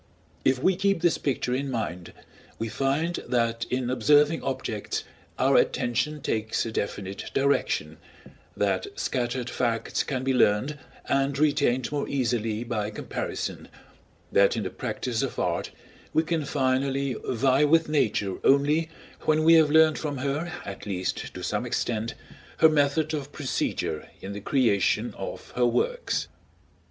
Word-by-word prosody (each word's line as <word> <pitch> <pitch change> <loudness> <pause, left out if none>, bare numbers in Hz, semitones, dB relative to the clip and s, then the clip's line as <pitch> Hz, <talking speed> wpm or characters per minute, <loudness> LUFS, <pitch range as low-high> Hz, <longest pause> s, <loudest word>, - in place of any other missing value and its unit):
If 130 -1 +3
we 185 +9 +2
keep 195 -1 +1
this 175 - +3
picture 125 -3 -1
in 135 +2 -1
mind, 90 -8 -4 0.5
we 115 - -3
find 140 +8 0
that 115 -1 0
in 125 -1 -1
observing 150 +4 +4
objects 115 -5 -3 0.3
our - - +4
attention 150 +5 +1
takes 110 -1 -1
a 115 - -4
definite 100 -2 -4
direction, 140 +1 +1 0.6
that - - 0
scattered 125 -1 -1
facts 115 -3 -1
can 130 -3 -3
be 135 0 +1
learned 125 +5 +2 0.3
and 135 0 +1
retained 140 -4 +2
more 145 -1 -1
easily 115 -4 0
by 110 -4 -2
comparison, 105 - -4 0.6
that 100 0 +4
in - - -1
the - - -4
practice 120 -3 -3
of - - -3
art - - -1 0.5
we 160 - +4
can 160 -2 -1
finally 135 0 0
vie 130 +3 +2
with 160 +2 +4
Nature 105 -10 0
only 150 +4 +3 0.4
when 155 0 +3
we 165 +1 +7
have 160 -2 +6
learned 160 0 +5
from 145 -3 -3
her, 140 +6 -2
at 100 +2 -7
least 95 -2 -3
to - - -8
some - - -1
extent, 115 -1 -2 0.4
her 160 - +7
method 155 +1 +2
of 145 -2 -4
procedure 130 - -2
in 100 - -6
the 100 - -6
creation 110 -5 +2
of - - -7
her 125 -1 +2
works. - - 0
135 Hz, 145 wpm, -26 LUFS, 115-150 Hz, 0.6 s, we